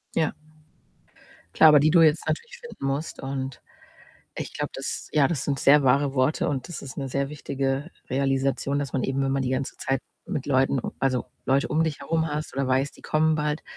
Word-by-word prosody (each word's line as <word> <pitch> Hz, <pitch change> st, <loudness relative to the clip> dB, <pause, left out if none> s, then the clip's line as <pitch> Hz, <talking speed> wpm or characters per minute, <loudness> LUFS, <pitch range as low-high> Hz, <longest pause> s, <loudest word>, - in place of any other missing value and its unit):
Ja. 160 Hz, -2 st, +1 dB, 1.2 s
Klar, 160 Hz, -, +8 dB
aber 150 Hz, -1 st, +7 dB
die 155 Hz, +2 st, +4 dB
du 170 Hz, -1 st, +6 dB
jetzt 155 Hz, 0 st, +4 dB
natürlich 480 Hz, +1 st, -3 dB
finden 470 Hz, -, -8 dB
musst. 140 Hz, +4 st, -3 dB
Und 135 Hz, -1 st, -4 dB, 0.8 s
ich -, -, -5 dB
glaube, -, -, -2 dB
das -, -, -5 dB
ja, 145 Hz, -3 st, +4 dB
das 160 Hz, -6 st, -2 dB
sind 140 Hz, -2 st, -1 dB
sehr 145 Hz, +1 st, +6 dB
wahre 140 Hz, +2 st, +3 dB
Worte 130 Hz, +3 st, +1 dB
und 140 Hz, +2 st, -3 dB
das 175 Hz, -, -7 dB
ist 135 Hz, -, -9 dB
'ne 135 Hz, -1 st, -3 dB
sehr 140 Hz, +1 st, -1 dB
wichtige 140 Hz, +1 st, -3 dB, 0.2 s
Realisation, 135 Hz, +1 st, 0 dB
dass 140 Hz, -3 st, -3 dB
man 130 Hz, -, 0 dB
eben, 135 Hz, +1 st, 0 dB
wenn 135 Hz, 0 st, 0 dB
man 135 Hz, -1 st, 0 dB
die 125 Hz, -, -1 dB
ganze 130 Hz, +1 st, -2 dB
Zeit 135 Hz, -1 st, -1 dB, 0.3 s
mit 140 Hz, -, -3 dB
Leuten 135 Hz, -1 st, +2 dB, 0.2 s
also, 130 Hz, -2 st, 0 dB, 0.2 s
Leute 135 Hz, +2 st, +2 dB
um 160 Hz, +2 st, +2 dB
dich 155 Hz, -3 st, -3 dB
herum 160 Hz, +3 st, 0 dB
hast 150 Hz, 0 st, -4 dB
oder 135 Hz, -1 st, 0 dB
weißt, 130 Hz, +2 st, 0 dB
die -, -, -17 dB
kommen 155 Hz, 0 st, +2 dB
bald, 150 Hz, 0 st, -1 dB
140 Hz, 205 wpm, -25 LUFS, 135-150 Hz, 1.2 s, Klar